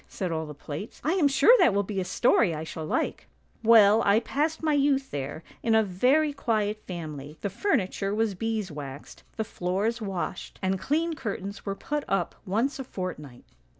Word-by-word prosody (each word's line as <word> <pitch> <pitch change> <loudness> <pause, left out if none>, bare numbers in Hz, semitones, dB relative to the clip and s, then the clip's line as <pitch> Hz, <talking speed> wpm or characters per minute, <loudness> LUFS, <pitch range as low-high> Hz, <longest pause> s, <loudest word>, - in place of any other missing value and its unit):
said 185 -3 -4
all 160 -1 -2
the 150 - -7
plates; 150 +8 -7
' - - -36
I 310 - +1
am 355 -6 +4
sure 280 - +6
that 205 - +5
will 200 - +2
be 195 0 -3
a - - 0
story 200 -4 +3
I 155 - -4
shall 160 -1 -6
like! - - -2
' - - -39
" - - -39
' - - -34
Well, 215 -1 +7
I 200 +2 +4
passed 305 +7 -1
my 310 -1 +2
youth 275 -1 +2
there, 145 +3 -4 0.2
in 225 -1 +2
a 220 - +5
very 260 +11 +2
quiet 215 -6 -1
family; 155 -4 -7
the 200 - -2
furniture 200 - 0
was 220 -1 +1
bees 215 -1 -2
waxed, 145 -1 -8 0.2
the 220 - 0
floors 205 +5 -2
washed, 190 -3 -4
and 190 0 0
clean 325 - 0
curtains 200 -7 -5
were 195 - -1
put 295 +7 -3
up 195 -4 0
once 235 +10 0
a - - -3
fortnight 150 - -7
205 Hz, 205 wpm, -27 LUFS, 180-255 Hz, 0.2 s, Well